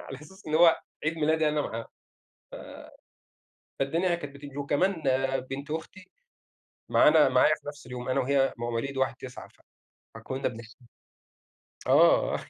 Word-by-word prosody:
على 135 - -8
أساس 190 +6 -15
إن 155 - -2
هو 165 0 +6 0.2
عيد 155 +1 0
ميلادي 155 0 +2
أنا 150 0 0
معاه، 115 +1 -4 1.8
ف - - -65
فالدنيا 170 +6 +1
كانت 145 -4 -8
بتيجي، 140 -1 -10
وكمان 155 +4 0
آآ، 135 0 +1
بنت 135 +3 -7
أختي 185 +4 -7 0.8
معانا، 150 -2 +6
معايا 130 +4 +4
في - - -17
نفْس 145 -3 -8
اليوم، 125 0 -6
أنا 130 +1 +1
وهي 135 +1 +2
مواليد 120 +3 -3
1/9، 130 -1 -4 0.7
فكنا 130 +1 -3
بنحت 115 -1 -11 1.1
آه. - - +4
140 Hz, 135 wpm, -28 LUFS, 130-155 Hz, 1.8 s, هو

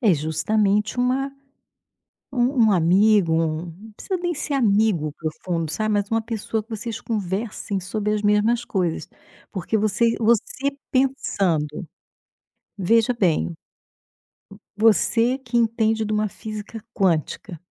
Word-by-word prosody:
é 210 -9 +4
justamente 200 - 0
uma, 255 +2 0 1.0
um 245 -1 +2
um - - +4
amigo, 185 +1 +4
um 160 -1 +1
não 200 +6 -12
precisa 380 - -3
nem 350 -1 -1
ser 290 0 -3
amigo 205 - +2
profundo, 165 +1 -4
sabe, 215 +4 0
mas 205 -1 -1
uma 225 0 +1
pessoa 220 -1 -3
que 230 - -31
vocês 225 0 -5
conversem 205 -1 -3
sobre 210 +3 -2
as 210 - -1
mesmas 215 +3 +2
coisas, 180 -7 -2 0.4
porque 205 +2 -1
você-você 230 +5 +1 0.2
pensando, 195 - 0 0.9
veja 225 +5 +3
bem, 160 - +1 1.2
você 230 +3 +3
que 250 -3 -4
entende 225 -1 +2
de 215 - -3
uma 215 0 +1
física 215 +1 -8
quântica, 175 0 -1
215 Hz, 120 wpm, -23 LUFS, 185-230 Hz, 1.2 s, é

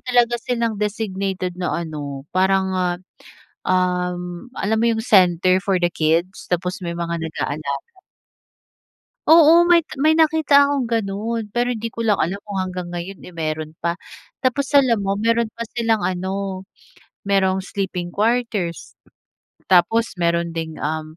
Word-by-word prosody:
talaga 240 -2 +2
silang 230 -3 -2
designated 195 -3 -2
na 175 - -1
ano, 145 -3 -6
parang, 190 0 +2
ah, 180 -1 0 0.7
um, 180 0 -1
alam 220 0 -1
mo 230 - +2
'yong 225 -1 -1
center 185 -3 +4
for 195 -3 +1
the 175 - +3
kids? 170 +3 0
Tapos 180 +1 -1
may 170 - -3
mga 170 0 -3
nag-aalaga. 155 -3 -4 1.4
Oo 330 +1 +7
may 335 -2 +5 0.2
may 315 +1 +4
nakita 310 -3 +5
akong 280 -4 0
ganun, 225 +1 -2
pero 245 +1 +1
hindi 230 -1 -3
ko 230 - -3
lang 215 -3 +2
alam 195 +5 -1
kung 200 -2 -5
hanggang 180 -1 -4
ngayon 175 +2 -6
eh - - -10
meron 155 -2 -3
pa. 170 0 -1 0.5
Tapos 265 +2 +1
alam 255 -6 +5
mo 195 0 -1
meron 230 +2 +1
pa 235 - -5
silang 225 -3 0
ano, 190 +1 -3 0.6
merong 190 -1 +2
sleeping 190 -2 -4
quarters, 210 -3 -1 0.8
tapos 225 +7 +4
meron 170 0 +1
ding 160 -1 -5
um, 155 +1 -4
190 Hz, 140 wpm, -21 LUFS, 175-230 Hz, 1.4 s, Oo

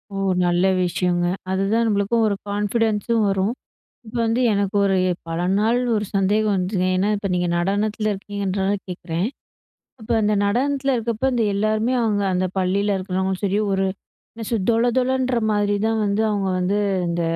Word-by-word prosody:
ஓ! - - -3 0.3
நல்ல 175 +1 +2 0.2
விஷயங்க. 175 0 0 0.3
அதுதான் 200 +5 +1
நம்பளுக்கும் 210 +2 +1
ஒரு 200 - 0
கான்ஃபிடன்ஸ் 210 +1 0
உம் 225 -2 +2
வரும். 195 +4 0 0.5
இப்ப 230 +3 -8
வந்து 225 +2 +1
எனக்கு 200 0 -1
ஒரு 195 -1 +2 0.2
எ - - +2 0.2
பல 165 +1 -2 0.2
நாள் 225 +3 +2 0.2
ஒரு 210 - -1
சந்தேகம் 205 +2 +2
வந்துதுங்க. 185 0 0
ஏன்னா 190 +3 +1
இப்ப 200 -1 -3
நீங்க 175 -1 0
நடனத்தில 210 +4 0
இருக்கீங்கன்றனால 195 0 -2
கேக்குறேன். 175 +1 -3 0.7
இப்ப 220 - -13
அந்த 210 0 +2
நடனத்தில 270 +5 +1
இருக்கப்ப 235 +2 -1
இந்த 235 -2 +1
எல்லாருமே 215 +4 +1
அவுங்க 210 -2 +1
அந்த 185 0 +1
பள்ளியில 195 +2 +1
இருக்கிறவங்களும் 190 +1 -2
சரி, 200 +1 +1
ஒரு 195 0 +1 0.5
என்ன 225 -1 -7
சொல் 210 -5 -1
தொல 230 +1 +2
தொலன்ற 255 0 +1 0.2
மாதிரி 205 0 +1
தான் 225 0 0
வந்து 200 +2 +1
அவுங்க 200 -2 -1
வந்து 190 +3 0 0.3
இந்த 170 0 -1
205 Hz, 160 wpm, -22 LUFS, 190-220 Hz, 0.7 s, நல்ல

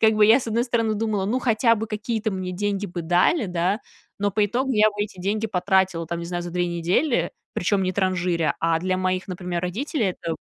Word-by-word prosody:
как 220 0 +5
бы 215 0 +5
я, 225 +4 +7
с 255 - -6
одной 230 +1 +1
стороны, 230 -3 0
думала: 210 -2 -1
"Ну, 225 +6 0
хотя 230 -1 +3
бы 220 0 -3
какие-то 220 0 -2
мне 185 -2 -4
деньги 205 +2 -1
бы 175 -1 -5
дали, 180 - +2
да." 180 +4 0 0.4
Но 205 0 +1
по 205 +2 +2
итогу 255 +6 -1
я 215 -1 +5
бы 205 0 -2
эти 205 -3 -7
деньги 210 +4 -1
потратила, 185 -3 +1
там, 170 +1 -3
не 170 - -5
знаю, 175 0 -3
за 175 - -6
2 175 +1 0
недели, 175 - +1 0.2
причём 195 +2 +1
не 185 0 0
транжиря. 180 -3 0
А 165 0 +2
для 185 +1 -1
моих, 185 0 -1
например, 180 -1 -4
родителей 220 - -1
это 165 -2 -4
195 Hz, 225 wpm, -24 LUFS, 180-220 Hz, 0.4 s, я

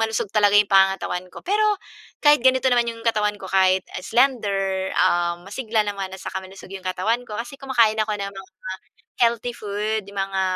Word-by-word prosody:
malusog 220 -2 -1
talaga 205 -1 +4
'yung 205 -1 +4
pangangatawan 190 -2 +2
ko. - - -11
Pero 415 +3 +1 0.6
kahit 295 0 +7
ganito 260 0 +4
naman 240 -1 +3
'yung 230 -1 -6
katawan 210 -2 +1
ko 190 - -7
kahit, 190 0 +3 0.2
ah, - - -9
slender, 200 -7 +1
ah, 175 0 +2
masigla 215 +2 -1
naman 195 -2 -4
at 190 - -10
saka 190 - -4
malusog 190 0 -12
'yung 195 -1 -8
katawan 215 +7 0
ko 210 - -8
kasi 240 +4 -6
kumakain 235 -5 +2
ako 215 0 0
ng 200 -1 -4
mga 195 -1 -11 0.7
healthy 235 +1 +2
food. 210 0 -3
'Yung 200 - -14
mga 195 0 -1
210 Hz, 190 wpm, -22 LUFS, 195-230 Hz, 0.7 s, kahit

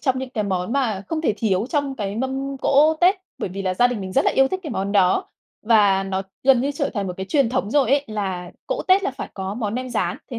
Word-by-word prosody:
trong 260 -3 0
những 260 0 -5
cái 215 -4 -2
món 185 +1 -2
mà 235 -8 0
không 320 -1 -2
thể 265 -9 +1
thiếu 200 -1 0
trong 285 -3 -1
cái 205 -3 -3
mâm 265 +2 -3
cỗ 295 +4 +4
Tết. 360 +2 +5 0.2
Bởi - - -3
vì 195 +2 -6
là 185 -1 -1
gia 245 +5 +4
đình 245 -4 -3
mình 190 -1 -6
rất 275 - +2
là - - +4
yêu 270 0 +3
thích 375 - -3
cái 310 - -6
món 200 -3 -2
đó 185 -3 +3 0.3
và 205 -4 +4
nó 195 0 -2 0.2
gần 265 -2 +5
như 275 +3 0
trở 285 0 -2
thành 200 -3 -2
một 180 - -3
cái 190 - -5
truyền 275 0 +2
thống 240 -5 -1
rồi 270 -2 +2
ấy, 280 +1 +3
là 190 -5 -4 0.2
cỗ - - -2
Tết 380 +2 +5
là 370 - 0
phải 270 - -7
có 190 0 -4
món 215 -2 -3
nem 255 0 -4
rán. 180 -6 -1
Thế 240 - -4
235 Hz, 275 wpm, -22 LUFS, 195-275 Hz, 0.3 s, Tết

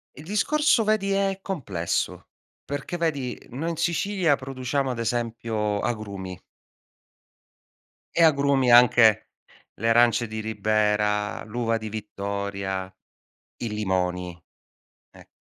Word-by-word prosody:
Il 150 - -11
discorso, 235 - +2
vedi, 210 -2 +1
è 195 -1 0
complesso. 110 - -3 0.4
Perché 145 +5 -4
vedi 145 -7 -2
noi 145 +7 -3
in 165 - -4
Sicilia 175 -1 +1
produciamo, 135 0 -2
ad 120 - -5
esempio, 115 -3 -1
agrumi. 100 -5 -4 1.7
E 170 - +4
agrumi 140 -4 +3
anche 120 -3 +6 0.5
le 115 - 0
arance 120 0 +4
di 110 0 -5
Ribera, 105 -1 0
l'uva 115 +1 -1
di 110 -1 -6
Vittoria, 100 -2 -4 0.7
i 115 - -1
limoni, 90 -4 -2 0.8
e - - -16
115 Hz, 105 wpm, -25 LUFS, 105-145 Hz, 1.7 s, anche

